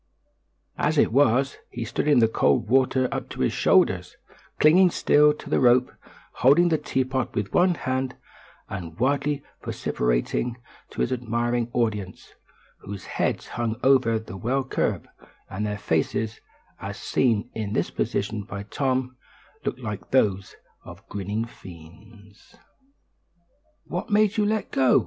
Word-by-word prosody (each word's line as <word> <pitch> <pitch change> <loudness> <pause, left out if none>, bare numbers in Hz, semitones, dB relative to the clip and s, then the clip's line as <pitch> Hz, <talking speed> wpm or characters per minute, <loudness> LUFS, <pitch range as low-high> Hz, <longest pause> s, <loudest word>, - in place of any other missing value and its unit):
As - - +1
it - - +4
was, 135 +1 +3
he 120 -1 -5
stood 120 +5 -2
in 145 -3 +5
the 115 -2 +5
cold 115 - +1
water 130 0 +3
up - - -4
to - - -6
his - - +1
shoulders, - - +2 0.4
clinging 180 +5 +6
still 150 -2 +4
to - - -12
the - - +1
rope, 125 0 +4 0.5
holding 145 +8 +5
the 160 -2 +1
teapot 130 0 -2
with 100 -2 -2
one 180 0 +4
hand, 130 -2 -2 0.5
and 85 -4 -7
wildly 140 +2 0 0.2
vociferating 60 - -1 0.3
to - - -5
his 60 - 0
admiring 120 0 -1
audience 105 -6 -2 0.5
whose 100 -2 -8
heads - - -2
hung 115 -1 -2
over 130 -4 +4
the 110 -3 -8
well 130 +7 0
curb, 130 - -2 0.4
and 105 +3 -2
their 105 0 -3
faces, 100 +6 -1 0.4
as - - -6
seen 120 -2 0
in 105 -2 -4
this - - -1
position 105 +1 -2
by 100 -1 -7
Tom, 130 +3 -1 0.5
looked 130 - -3
like 105 -6 -6
those 100 -8 +1 0.3
of - - -13
grinning 105 +3 -3
fiends. 105 - -15 1.3
"What 175 +2 -5
made 210 0 +3
you 210 -1 +2
let 215 0 -1
go?" 130 -2 +4
120 Hz, 140 wpm, -25 LUFS, 105-135 Hz, 1.3 s, clinging